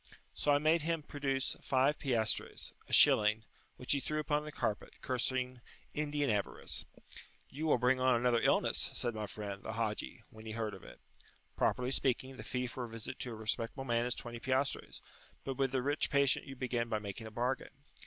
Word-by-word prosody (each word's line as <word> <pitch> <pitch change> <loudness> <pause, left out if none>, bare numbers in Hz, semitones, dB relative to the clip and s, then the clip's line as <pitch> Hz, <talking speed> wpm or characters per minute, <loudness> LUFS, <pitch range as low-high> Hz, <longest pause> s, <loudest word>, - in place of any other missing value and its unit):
So 145 - +1
I 145 - +6
made 155 +3 +3
him 165 0 -1
produce 135 -3 -1
five 135 +3 +2
piastres, 115 -5 -1 0.2
a - - -10
shilling, 110 +1 +6 0.3
which 125 - -3
he 140 - +4
threw 155 +3 -2
upon 150 -1 +1
the 150 - -6
carpet, 105 -7 -2
cursing 125 0 -1 0.3
Indian 145 -1 0
avarice. 105 -4 -1 0.7
"You 155 +4 -3
will 150 - +5
bring 125 +1 +3
on 130 -1 +4
[p.54]another 120 -1 +3
illness," - - +3
said 120 -1 0
my 110 -1 -3
friend, 100 -2 -6
the 110 - -5
Haji, 110 -2 -3
when 110 0 -11
he 110 - -4
heard 110 -2 -2
of 95 - -10
it. - - -12 0.6
Properly 125 0 +1
speaking, 130 0 0
the - - -7
fee 125 0 -2
for 125 +1 -4
a - - -9
visit 115 -1 -5
to 125 - -3
a - - -5
respectable 115 +4 -2
man 120 -1 +1
is 125 - -1
20 120 0 -6
piastres, 130 +3 -1 0.4
but 135 -1 -3
with 135 -2 +2
the 130 -2 0
rich 145 +3 +1
patient 140 -1 +3
you 135 - -7
begin 120 -2 -1
by 110 - +1
making 105 +2 -6
a - - -9
bargain. 130 +4 -2
125 Hz, 195 wpm, -34 LUFS, 115-135 Hz, 0.7 s, I